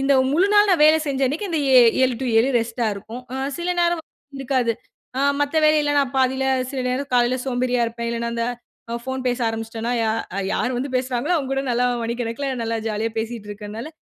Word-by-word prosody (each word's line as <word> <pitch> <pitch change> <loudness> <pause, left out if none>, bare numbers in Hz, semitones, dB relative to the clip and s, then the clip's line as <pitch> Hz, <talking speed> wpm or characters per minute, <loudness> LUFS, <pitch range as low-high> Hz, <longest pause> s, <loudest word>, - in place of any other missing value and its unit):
இந்த 275 +1 +2 0.2
முழுநாள் 410 +6 +4
நான் 355 -4 +3
வேல 310 +1 +7
செஞ்ச 275 -2 -2
அன்னக்கி 305 +10 -2
இந்த 320 -3 0
ஏ 260 - +8 0.3
7 255 -1 +1
டூ 265 - -2
7 235 +4 +3
ரெஸ்ட்டா 230 0 -2
இருக்கும். 220 +5 -9
அ - - -3 0.2
சில 345 +1 -1
நேரம் 345 -1 +1 0.4
இருக்காது. 255 -3 +1 0.5
ஆ - - +1 0.2
மத்த 290 +2 0
வேலையில 305 -1 +3
நான் 275 -2 +1
பாதியில 265 0 +2 0.3
சில 270 -2 -3
நேரம் 265 +3 -2
காலையில 245 +1 +3
சோம்பேறியா 250 -1 0
இருப்பேன். 235 0 -4
இல்லையின்னா 235 0 -2
அந்த 230 - -1 0.5
அ - - -1
ஃபோன் 260 0 -4
பேச 245 - -1
ஆரம்பிச்சுட்டேன்னா 225 +1 -4
யா 220 - +1 0.4
யார் 250 0 -1
வந்து 265 +2 -3
பேசுறாங்களோ, 255 +5 -1
அவுங்ககூட 270 -2 -1
நல்லா 245 +1 +2 0.2
மணி 230 +1 -2
கணக்குல, 240 +4 -3
நல்லா 230 0 -1
ஜாலியா 220 +1 -2
பேசிக்கிட்டு 225 -2 -5
இருக்கிறனால, 210 +5 -7
255 Hz, 195 wpm, -22 LUFS, 230-280 Hz, 0.5 s, ஏ